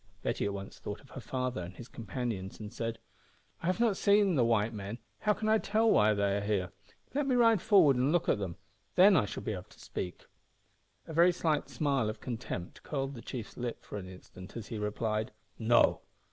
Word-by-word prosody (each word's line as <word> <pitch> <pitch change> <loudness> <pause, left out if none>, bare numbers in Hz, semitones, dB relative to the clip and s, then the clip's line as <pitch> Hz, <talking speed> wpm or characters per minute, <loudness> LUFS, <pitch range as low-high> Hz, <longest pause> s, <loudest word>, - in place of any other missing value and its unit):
Betty - - -1
at 100 - -1
once 100 0 -8
thought 105 - -5
of 135 - -19
her 135 - -7
father 130 -2 -2
and 90 +1 -7
his 120 - -9
companions, 110 -4 -4
and 105 -1 -7
said 115 0 -3 0.6
"I 165 - -3
have 185 +4 +1
not 225 -5 +3
seen 200 -2 +4
the 130 -6 +3
white 115 -1 +2
men. 100 +1 -5 0.2
How 210 - +2
can 215 +1 -3
I 220 0 +4
tell 220 +2 +2
why 105 0 +5
they 100 0 +1
are - - -1
here? 100 -3 -1 0.4
Let 285 0 0
me 260 - +3
ride 230 -5 +5
forward 185 - +5
and 130 +4 +2
look 175 0 +2
at - - +2
them 95 -4 -4 0.4
then 190 +2 +7
I 140 - +4
shall - - -6
be 110 - -2
able 90 -2 -6
to - - -20
speak." 90 - -6 0.8
A 160 - -8
very 170 +3 +6
slight 160 -3 0
smile 140 -7 +1
of 110 - -5
contempt 115 -8 -5
curled 135 -2 -3
the 120 - -8
chiefs 120 -3 -7
lip 120 -1 -4
for - - -7
an 90 -1 -8
instant 90 +2 -11
as 110 - -7
he 110 - -4
replied 110 +1 -1 0.3
"No. 120 +1 +4
120 Hz, 215 wpm, -31 LUFS, 105-170 Hz, 0.8 s, then